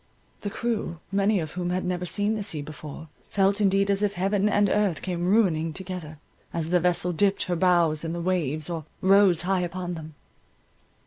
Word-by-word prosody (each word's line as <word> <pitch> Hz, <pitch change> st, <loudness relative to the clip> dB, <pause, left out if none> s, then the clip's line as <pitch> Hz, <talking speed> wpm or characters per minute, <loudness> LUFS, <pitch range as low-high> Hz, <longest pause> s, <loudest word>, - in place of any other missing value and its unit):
The 205 Hz, -, -4 dB
crew, 220 Hz, -6 st, -2 dB
many 200 Hz, +1 st, +2 dB
of 155 Hz, -2 st, -4 dB
whom 180 Hz, -1 st, -3 dB
had 185 Hz, +1 st, -1 dB
never 180 Hz, 0 st, -2 dB
seen 205 Hz, +4 st, +1 dB
the 215 Hz, -, -2 dB
sea 160 Hz, -8 st, -2 dB
before, 155 Hz, +1 st, -9 dB, 0.2 s
felt 200 Hz, +1 st, +2 dB
indeed 195 Hz, 0 st, +3 dB
as 200 Hz, 0 st, +1 dB
if 205 Hz, -1 st, +1 dB
heaven 195 Hz, +2 st, +1 dB
and 205 Hz, 0 st, +3 dB
earth 200 Hz, -6 st, +1 dB
came 175 Hz, -1 st, -2 dB
ruining 170 Hz, -6 st, +2 dB
together, 180 Hz, -4 st, -6 dB, 0.3 s
as 165 Hz, 0 st, -3 dB
the 180 Hz, -, +4 dB
vessel 180 Hz, 0 st, +1 dB
dipped 195 Hz, +4 st, +2 dB
her 180 Hz, -, -1 dB
bows 170 Hz, -3 st, +3 dB
in 165 Hz, -, -3 dB
the 170 Hz, -, -3 dB
waves, 160 Hz, -4 st, -1 dB
or 165 Hz, -3 st, -4 dB, 0.2 s
rose 190 Hz, -3 st, +5 dB
high 185 Hz, 0 st, +1 dB
upon 180 Hz, 0 st, -4 dB
them. 160 Hz, -2 st, -8 dB
180 Hz, 190 wpm, -26 LUFS, 165-200 Hz, 0.3 s, rose